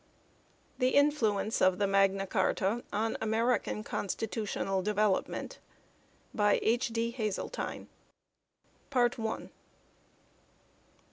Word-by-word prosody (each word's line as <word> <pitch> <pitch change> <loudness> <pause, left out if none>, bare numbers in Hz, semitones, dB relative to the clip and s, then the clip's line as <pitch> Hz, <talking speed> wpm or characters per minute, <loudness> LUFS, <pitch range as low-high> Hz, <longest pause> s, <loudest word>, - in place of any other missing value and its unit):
THE 255 0 +2
INFLUENCE 230 -8 +2
OF 185 -1 +4
MAGNA 195 -1 +2
CARTA 195 +3 0
ON 220 +2 -1
AMERICAN 220 0 0
CONSTITUTIONAL 205 -2 -2
DEVELOPMENT. 210 0 0 0.7
BY 205 -1 +3
H. 235 +3 +2
D. 230 0 -1
HAZELTINE, 220 - -4 1.0
M.A., 245 -3 +4
Lnr. 225 -2 -4
215 Hz, 80 wpm, -31 LUFS, 195-235 Hz, 1.0 s, OF